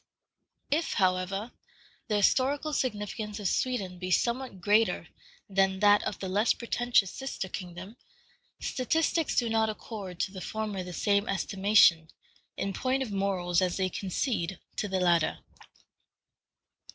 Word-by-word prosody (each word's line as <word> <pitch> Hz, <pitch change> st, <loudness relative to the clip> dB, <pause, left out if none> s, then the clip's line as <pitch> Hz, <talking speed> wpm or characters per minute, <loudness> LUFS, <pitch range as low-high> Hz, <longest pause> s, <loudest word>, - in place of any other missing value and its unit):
If, 320 Hz, +3 st, +1 dB
however, 190 Hz, +3 st, 0 dB, 0.6 s
the 215 Hz, -, 0 dB
historical 275 Hz, +8 st, +2 dB
significance 210 Hz, -4 st, -3 dB
of 205 Hz, -, -1 dB
Sweden 195 Hz, -6 st, -1 dB
be 185 Hz, 0 st, -4 dB
somewhat 235 Hz, +2 st, 0 dB
greater 210 Hz, +4 st, +2 dB, 0.4 s
than 195 Hz, -1 st, +2 dB
that 205 Hz, 0 st, +6 dB
of -, -, -3 dB
the 190 Hz, -, -5 dB
less 205 Hz, +5 st, +2 dB
pretentious 240 Hz, -4 st, +1 dB
sister 270 Hz, -7 st, -4 dB
kingdom, 185 Hz, +4 st, -8 dB, 0.6 s
statistics 320 Hz, +4 st, 0 dB
do 240 Hz, -, +3 dB
not 225 Hz, -1 st, +2 dB
accord 205 Hz, -4 st, -7 dB
to 190 Hz, -, -1 dB
the 190 Hz, -2 st, -8 dB
former 215 Hz, -2 st, -3 dB
the 180 Hz, -, -7 dB
same 200 Hz, +3 st, +1 dB
estimation, 195 Hz, -3 st, +4 dB, 0.5 s
in 195 Hz, -, -2 dB
point 260 Hz, +4 st, 0 dB
of 235 Hz, -, -6 dB
morals, 190 Hz, -3 st, 0 dB
as 180 Hz, -1 st, 0 dB
they 190 Hz, -1 st, +1 dB
concede 190 Hz, -1 st, -2 dB, 0.2 s
to 210 Hz, -, -1 dB
the 190 Hz, -1 st, -1 dB
latter. 170 Hz, -3 st, +2 dB
205 Hz, 135 wpm, -29 LUFS, 185-235 Hz, 0.6 s, that